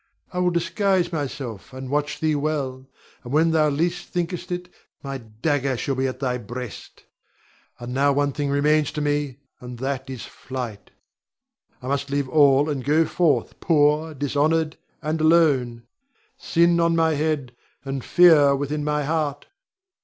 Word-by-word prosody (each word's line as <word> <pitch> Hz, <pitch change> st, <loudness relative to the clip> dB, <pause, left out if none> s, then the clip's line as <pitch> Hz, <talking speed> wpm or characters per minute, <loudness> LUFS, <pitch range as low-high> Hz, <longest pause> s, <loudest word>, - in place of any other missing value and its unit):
I 180 Hz, -, -2 dB
will 180 Hz, 0 st, +3 dB
disguise 180 Hz, +1 st, 0 dB
myself, 135 Hz, -, -5 dB
and 130 Hz, 0 st, -7 dB
watch 150 Hz, +1 st, -1 dB
thee 155 Hz, -1 st, +2 dB
well, 140 Hz, -3 st, -2 dB, 0.4 s
and 120 Hz, -, -8 dB
when 160 Hz, +3 st, +3 dB, 0.3 s
least 175 Hz, +2 st, -1 dB
thou -, -, -32 dB
thinkest 180 Hz, +1 st, -3 dB
it, 180 Hz, 0 st, -3 dB, 0.4 s
my 135 Hz, -1 st, -5 dB
dagger 130 Hz, +4 st, -1 dB
shall 135 Hz, -, -2 dB
be 135 Hz, 0 st, 0 dB
at 130 Hz, -1 st, -5 dB
thy 125 Hz, -2 st, -1 dB
breast. 120 Hz, +1 st, -8 dB, 0.8 s
And 120 Hz, +1 st, -6 dB
now 140 Hz, +2 st, +3 dB
one 145 Hz, 0 st, +1 dB
thing 145 Hz, +1 st, -2 dB
remains 150 Hz, +1 st, +2 dB
to 150 Hz, -, -3 dB
me, 145 Hz, -3 st, -1 dB, 0.2 s
and 125 Hz, 0 st, -9 dB
that 135 Hz, +1 st, -3 dB
is 130 Hz, -3 st, -6 dB
flight. 125 Hz, -6 st, -7 dB, 0.9 s
I -, -, -6 dB
must 140 Hz, +1 st, -1 dB
leave 140 Hz, -1 st, -1 dB
all 140 Hz, -1 st, +4 dB
and 140 Hz, -4 st, -2 dB
go 155 Hz, +4 st, +3 dB
forth 165 Hz, -2 st, 0 dB
poor, 155 Hz, -1 st, +2 dB
dishonored, 155 Hz, +3 st, 0 dB, 0.3 s
and 155 Hz, +1 st, -1 dB
alone; 145 Hz, -8 st, +3 dB, 0.5 s
sin 170 Hz, 0 st, +2 dB
on 170 Hz, 0 st, +3 dB
my 160 Hz, -1 st, +3 dB
head, 145 Hz, -4 st, -2 dB, 0.3 s
and 135 Hz, -2 st, -4 dB
fear 155 Hz, -6 st, +6 dB
within 145 Hz, +2 st, -2 dB
my 150 Hz, 0 st, 0 dB
heart. 150 Hz, -1 st, -2 dB
145 Hz, 155 wpm, -23 LUFS, 135-160 Hz, 0.9 s, fear